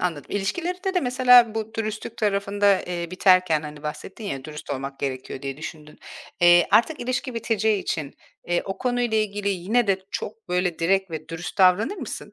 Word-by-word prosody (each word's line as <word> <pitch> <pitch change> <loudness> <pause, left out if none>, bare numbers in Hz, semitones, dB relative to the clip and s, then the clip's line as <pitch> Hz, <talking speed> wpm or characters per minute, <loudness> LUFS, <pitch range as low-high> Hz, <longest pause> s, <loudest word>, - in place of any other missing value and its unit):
anladım. 165 -5 -3
İlişkilerinde 355 - -2
de, 360 - +3
mesela, 250 -3 +5
bu 220 0 -4
dürüstlük 215 +1 -4
tarafında, 200 -1 +2
eee, 175 -1 -4
biterken 185 -4 +3
hani, 150 -1 -9
bahsettin 155 +8 -7
ya, 135 -9 -4
"Dürüst 150 -1 -8
olmak 135 0 -4
gerekiyor." 130 0 -4
diye 135 -1 -4
düşündün. 150 0 -9 0.4
Eee, 175 0 +6
artık 300 +7 +3
ilişki 255 +1 -3
biteceği 220 -2 0
için, 150 -4 -3 0.3
eee, 175 0 0
o 195 - -5
konuyla 245 -3 0
ilgili 205 -1 -1
yine 200 +6 +1
de 195 -1 +2
çok, 215 +2 -6
böyle, 180 -1 0
direkt 190 +2 +1
ve 160 0 -6
dürüst 165 +3 -6
davranır 195 - +4
mısın? 250 - -7
195 Hz, 170 wpm, -24 LUFS, 165-225 Hz, 0.4 s, Eee